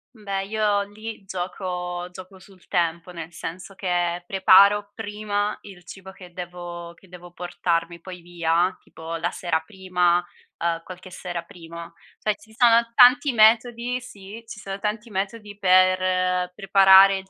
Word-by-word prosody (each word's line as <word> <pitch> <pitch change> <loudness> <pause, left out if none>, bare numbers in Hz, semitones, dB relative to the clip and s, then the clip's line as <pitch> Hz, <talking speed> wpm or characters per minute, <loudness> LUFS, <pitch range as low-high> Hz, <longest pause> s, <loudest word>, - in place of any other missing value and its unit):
Beh, 195 -2 -4
io 210 -1 +1
lì 215 0 -9
gioco 180 -1 -4
gioco 185 +1 -12
sul 185 -1 -19
tempo, 170 -1 -1
nel 170 -1 -8
senso 180 +4 -8
che 175 -2 -1
preparo 200 +2 +5
prima 210 -1 -2
il 190 -3 -13
cibo 190 +1 -11
che 180 -2 -14
devo 175 -1 -8
che 190 - -21
devo 175 -1 -12
portarmi 170 -1 -2
poi 180 0 -10
via, 175 +1 0
tipo 165 +1 -8
la 170 +2 -1
sera 170 -3 -1
prima, 180 -1 0 0.4
uhm, 165 0 -1
qualche 185 +1 -11
sera 175 -1 -6
prima. 170 0 -11 0.3
Cioè, 215 - 0
ci 220 +1 -20
sono 235 -2 +5
tanti 265 +2 +6
metodi 235 +2 +3
sì, 210 -1 -11
ci 215 - -9
sono 195 -1 -6
tanti 215 +2 -4
metodi 205 +1 -4
per 185 -1 +3
preparare 195 0 +6
il 190 0 -10
185 Hz, 145 wpm, -23 LUFS, 175-205 Hz, 0.4 s, tanti